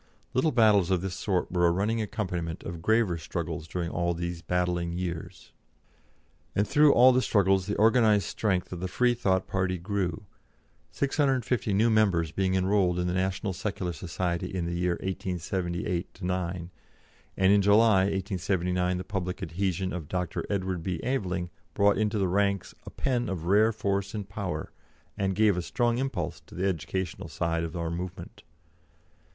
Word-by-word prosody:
Little 145 +5 +2
battles 105 - +4
of 95 -2 +2
this 95 -1 -3
sort 95 -1 -1
were 90 -1 +3
a - - +4
running 105 +6 0
accompaniment 90 -6 -3
of 85 -1 -6
graver 110 -4 +2
struggles 80 -1 -4
during 85 0 -3
all 85 -1 0
these 85 0 -4
battling 90 -1 -1
years. 85 -2 -5 1.0
And 105 +1 +2
through 150 0 +5
all 125 +1 +7
the 130 0 +3
struggles 95 -4 +2
the 105 - -2
organised 110 -3 +4
strength 95 -4 -1
of 90 - -5
the 95 - -2
Freethought 100 -3 +1
party 95 -1 -1
grew, 95 0 -2 0.6
650 130 -6 0
new 115 +3 +3
members 95 -8 +2
being 95 +1 0
enrolled 95 -1 +2
in 90 - 0
the 90 - -1
National 95 +2 -1
Secular 90 -2 -3
Society 85 +2 -3
in 90 -3 -2
the 85 - -3
year 90 0 +1
1878 90 -1 -3
79, 90 -1 -3 0.7
and 95 +1 +5
in 100 - +5
July, 100 -1 +5
1879, 90 -2 -1
the 90 - -4
public 95 0 -4
adhesion 95 +2 -2
of 85 -5 -5
Dr. 90 +1 -2
Edward 95 -3 -1
B. 90 -1 -3
Aveling 90 -9 -2 0.2
brought 100 0 +3
into 105 0 +1
the 95 -2 +1
ranks 100 +1 0
a - - -4
pen 125 -3 -1
of 90 -4 -4
rare 105 +5 +4
force 100 -1 -2
and 105 -2 -4
power, 95 -6 -4 0.4
and 95 -1 -1
gave 105 -1 +4
a 90 - -1
strong 120 +6 0
impulse 135 0 -3
to - - -13
the 95 - -1
educational 95 0 -3
side 85 -1 -1
of 80 0 -5
our 85 -1 -2
movement. 90 +1 -6
95 Hz, 165 wpm, -28 LUFS, 90-105 Hz, 1.0 s, all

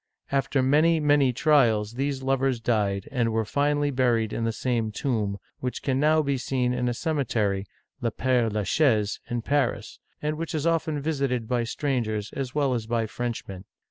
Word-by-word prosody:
After 135 -1 +1
many, 155 +5 +4
many 145 -3 +4
trials, 115 -7 +3
these 135 +1 -2
lovers 135 -2 +1
died, 105 -4 0
and 120 -4 +1
were 110 0 0
finally 145 +4 +1
buried 120 -4 +1
in 115 - -1
the 115 - +1
same 115 -2 -1
tomb, 105 -5 -1 0.2
which 125 -1 -4
can 135 -1 0
now 155 +2 +4
be 140 -2 0
seen 125 -1 0
in 125 0 0
a - - -1
cemetery 110 - -1 0.3
(Le 115 -2 0
P^re 125 -2 +1
La 105 0 -1
Chaise) 110 -5 +2
in 120 -1 -2
Paris, 125 -6 -1 0.2
and 150 +1 -2
which 165 0 -3
is 155 0 -1
often 165 -2 +1
visited 135 -6 -1
by 120 -1 0
strangers 115 -5 -2
as 135 -1 -4
well 140 -3 +2
as 115 -3 -3
by 115 -1 0
French 120 +1 -4
men. 95 -1 -8
125 Hz, 180 wpm, -26 LUFS, 115-145 Hz, 0.3 s, many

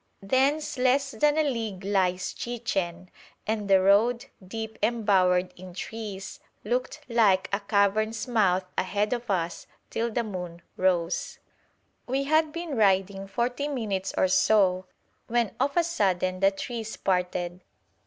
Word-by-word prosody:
Thence 270 +7 +1
less 270 +2 +2
than 295 +6 +2
a 315 - +4
league 225 -9 -3
lies 185 -2 0
Chichen, 195 -7 -3 0.3
and 210 -2 -2
the 195 -1 +6
road, 210 +6 +3 0.2
deep 220 +3 -6
embowered 195 -5 +2
in 180 -1 -11
trees, 205 -2 -6 0.2
looked 250 +6 -2
like 215 -6 +3
a 200 - +2
cavern's 215 +3 +1
mouth 190 -6 +2
ahead 205 +4 0
of 240 -1 -5
us 175 -3 -2 0.2
till 230 +1 -1
the 235 +1 -1
moon 180 -5 -6
rose. 180 -2 0 0.7
We 265 +2 0
had 310 +2 +2
been 335 -2 -4
riding 195 -2 +2
forty 245 +7 -1
minutes 210 -9 -2
or - - +4
so, 185 -1 +3 0.4
when 235 -3 0
of 280 +5 0
a 345 - +5
sudden 185 - 0
the 195 0 +5
trees 220 +2 -6
parted. 180 -1 -1
210 Hz, 135 wpm, -27 LUFS, 185-240 Hz, 0.7 s, the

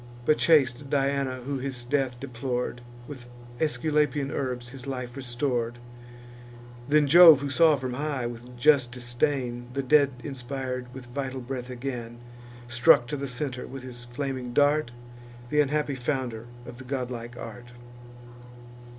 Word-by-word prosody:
But 155 - +3
chaste 140 -4 +3
Diana, 135 -2 0
who 140 0 -2
his 130 -2 -4
death 125 -1 -1
deplor'd, 125 -1 -3 0.3
With 125 -4 -10 0.3
Aesculapian 150 -2 +1
herbs 125 -3 -3
his 135 +1 -10
life 125 -2 -5
restor'd. 120 -2 -2 1.1
Then 150 0 +5
Jove, 160 -1 +9
who 140 -1 -3
saw 160 0 +5
from 130 -2 -4
high, 140 -2 -2
with 120 +1 -8
just 135 -2 +4
disdain, 120 0 -2
The 140 +1 -2
dead 140 0 +4
inspir'd 130 -2 -5
with 130 -1 -9
vital 130 +1 -4
breath 125 0 -6
again, 120 -2 -5 0.5
Struck 120 0 +5
to 150 - -2
the 140 0 -4
centre, 125 0 -4
with 135 0 -8
his 120 -1 -8
flaming 125 0 -4
dart, 145 0 +3 0.6
Th' 150 - +2
unhappy 150 0 0
founder 125 -3 -3 0.2
of 120 0 -10
the - - -8
godlike 125 -2 -5
art. 120 -1 -8
130 Hz, 140 wpm, -27 LUFS, 120-140 Hz, 1.1 s, Jove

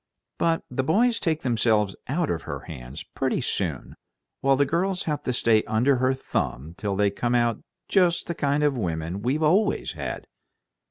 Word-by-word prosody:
But 165 -1 +1
the 130 +1 -2
boys 230 - +3
take 160 -2 0
themselves 110 -5 +2
out 155 +4 0
of 85 - -2
her - - -6
hands 65 +5 -8
pretty - - -2
soon, - - -2 0.5
while 135 0 +3
the 140 +1 +3
girls 180 +5 0
have 150 -2 -2
to - - -2
stay 115 -3 +3
under 125 +5 +2
her 130 +1 +2
thumb 75 - -3
till 100 +1 -2
they 100 0 +2
come 120 +4 -1
out 120 -1 +1 0.3
just 180 -3 +3
the 170 - -3
kind 145 -1 0
of 145 -2 +2
women 85 -3 -3
we've 135 +7 0
always 195 +7 +2
had." - - -5
130 Hz, 175 wpm, -25 LUFS, 105-160 Hz, 0.5 s, boys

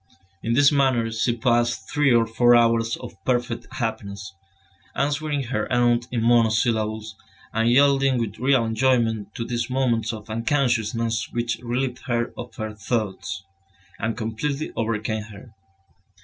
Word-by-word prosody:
In 115 - -1
this 140 +3 +5
manner 130 -5 +2
she 115 +1 0
passed 120 0 +1
three 150 -2 +3
or 115 -1 +4
four 120 +2 +4
hours 115 -1 +3
of 95 -3 -11
perfect 120 -2 -1
happiness, 100 -5 -4 0.6
answering 145 0 -1
her 120 -3 -3
aunt 120 -1 +2
in 120 -2 -1
monosyllables, 110 -2 +2 0.4
and 115 +1 +2
yielding 135 0 +4
with 110 -3 -3
real 130 -2 +3
enjoyment 115 -2 +1
to 115 - -3
these 120 0 -2
moments 120 -4 0
of 110 -2 -8
unconsciousness 115 -2 0
which 120 0 -2
relieved 125 +1 -2
her 120 -1 -1
of 120 -2 -8
her 110 0 -5
thoughts, 95 -3 -3 0.6
and 110 0 -2
completely 135 +7 -3
overcame 110 -1 -2
her. 105 +2 -13
115 Hz, 135 wpm, -23 LUFS, 110-125 Hz, 0.6 s, this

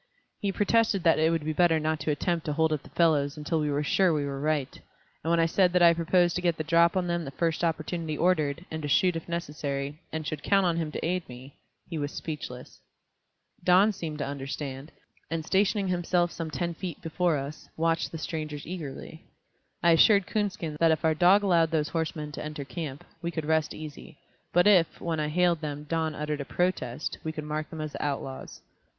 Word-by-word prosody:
He 200 - -1
protested 205 -1 +2
that 165 - +4
it 160 +1 +4
would 165 -2 -1
be 155 - -1
better 165 -1 +4
not 155 0 -1
to 150 - -3
attempt 165 +2 -1
to 150 - 0
hold 160 +1 +2
up 150 - -2
the - - -15
fellows 150 -4 +2
until 155 +2 -1
we 150 -1 0
were 145 +1 0
sure 185 +4 +3
we 150 -2 0
were 140 -1 -4
right, 150 -3 -1 0.4
and 160 - -2
when 170 0 +3
I 165 - +4
said 180 +2 +3
that 180 -1 +4
I 170 0 +8
proposed 175 +1 +2
to - - -2
get 170 -3 +1
the 155 - -2
drop 170 +3 +4
on 185 - +1
them 170 -1 -1
the 135 - -5
first 165 +4 -1
opportunity 160 -1 -2
offered, 165 -2 +1
and 160 0 -4
to 145 - -3
shoot 180 +5 +3
if 165 +1 -6
necessary, 145 -3 -3
and 160 -1 -4
should 150 +1 -4
count 195 +4 +3
on 170 -2 +1
him 160 -2 -2
to - - -3
aid 180 -1 -2
me, 125 +3 -11 0.3
he 165 -3 -4
was 145 0 -2
speechless. 130 -5 -7 0.8
Don 185 +4 +5
seemed 165 -7 -5
to 145 - -2
understand, 140 +1 -5 0.4
and 165 -1 -3
stationing 195 +1 +2
himself 175 -1 +1
some 165 -1 -5
ten 170 +2 -2
feet 170 -1 -6
before 165 0 +1
us, 140 +2 -7
watched 165 0 +1
the 165 - -5
strangers 155 -2 -5
eagerly. 160 -1 -7 0.6
I 170 - +6
assured 200 +4 +6
Coonskin 195 -8 -2
that 165 - +5
if 160 0 +1
our 160 - +4
dog 180 +6 +5
allowed 170 -4 +3
those 155 -2 0
horsemen 155 -2 -3
to - - -6
enter 150 -2 -5
camp, 145 -3 -6 0.2
we 170 - -2
could 160 -2 -4
rest 160 0 +1
easy, 155 -1 -9 0.3
but 175 +1 +4
if, 185 -6 +4
when 165 -2 -2
I 150 - 0
hailed 170 +1 +2
them, 150 -1 -4
Don 160 0 -1
uttered 150 -1 -3
a - - -5
protest, 180 +5 -2
we 160 - -2
could 155 -1 -6
mark 150 +1 -3
them 160 - -8
as 155 -1 -4
the - - -5
outlaws. 135 -2 -4
160 Hz, 215 wpm, -28 LUFS, 150-175 Hz, 0.8 s, I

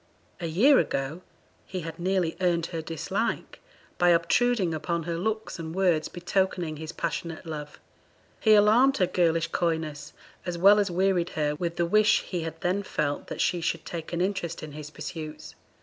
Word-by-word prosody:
A 170 - -3
year 240 - +5
ago 135 +6 -2 0.5
he 185 -1 -4
had 165 0 -7
nearly 180 -2 0
earned 170 -2 +2
her 165 - -2
dislike 160 -1 -3 0.4
by 175 - +5
obtruding 180 +3 +3
upon 165 +2 -2
her 170 +1 -3
looks 215 +3 -3
and 160 0 -6
words 180 -5 +2
betokening 175 -3 -1
his 155 +1 -6
passionate 165 0 -4
love. 150 -2 -7 0.6
He 215 -1 +6
alarmed 230 +7 +5
her 185 - +3
girlish 165 -2 +1
coyness, 160 -3 -2 0.3
as 175 -1 -3
well 200 +4 +7
as 205 -1 +1
wearied 180 -1 +1
her 150 -1 +1
with 170 +2 -3
the 170 - +1
wish 215 +4 +4
he 180 -3 -3
had 165 0 -5
then 185 +3 +1
felt 150 -6 -2
that - - -4
she 175 -1 +1
should 165 0 -2
take 165 -2 -6
an 170 0 -1
interest 185 -4 -2
in 155 - -7
his 150 0 -8
pursuits. 155 0 -7
170 Hz, 175 wpm, -27 LUFS, 160-190 Hz, 0.6 s, well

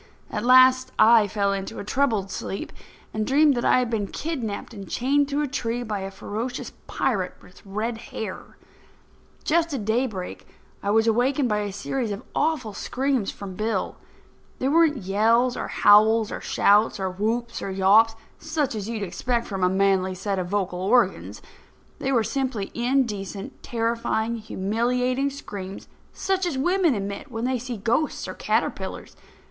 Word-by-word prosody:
At 210 - -3
last, 255 +1 +6
I 225 -2 +6
fell 200 0 0
into 195 -1 -5
a - - -5
troubled 210 -4 0
sleep, 195 +1 -5 0.4
and 215 - -1
dreamed 285 +5 +4
that 240 - -1
I - - +4
had 250 -2 0
been 210 -3 -1
kidnapped 240 - -4
and 200 -4 -9
chained 280 +3 +1
to 290 +1 0
a - - -1
tree 245 -3 -2
by 215 -3 -3
a 195 0 -4
ferocious 220 +6 -5 0.2
pirate 195 -8 -1
with 180 - -18
red 220 +4 -3
hair. 215 -3 -7 0.9
Just 330 -1 +1
at 220 -6 -4
daybreak, 220 -4 -2 0.3
I 200 - -2
was 220 +2 +4
awakened 245 +4 +2
by 210 -1 +1
a 205 -1 -3
series 235 +4 -3
of 205 +3 -5
awful 290 -10 0
screams 260 -2 -1
from 195 -2 -7
Bill. 215 0 -2 0.6
They 260 - -1
weren't 315 0 +4
yells, 230 +6 +3
or - - -3
howls, 215 +1 +5
or - - -5
shouts, 210 +1 +3
or 190 -1 -1
whoops, 230 +5 -2
or - - -4
yawps, 200 +4 +4 0.2
such 310 -4 -1
as 215 -1 -4
you'd 220 -3 -3
expect 235 +5 -1
from 195 -3 -3
a 180 - +4
manly 190 -1 +2
set 195 +1 -2
of 180 - -3
vocal 185 -3 -1
organs—they 225 +5 -2
were 235 -4 +3
simply 255 -6 -2
indecent, 230 -6 -2
terrifying, 230 -1 -1
humiliating 245 +6 0
screams, 200 -9 -8 0.2
such 380 -1 -1
as 305 -6 -2
women 350 0 +2
emit 200 +6 -5
when 230 -1 -3
they 255 -1 0
see 245 0 -5
ghosts 235 +9 0
or - - -5
caterpillars. - - -2
225 Hz, 160 wpm, -24 LUFS, 200-255 Hz, 0.9 s, last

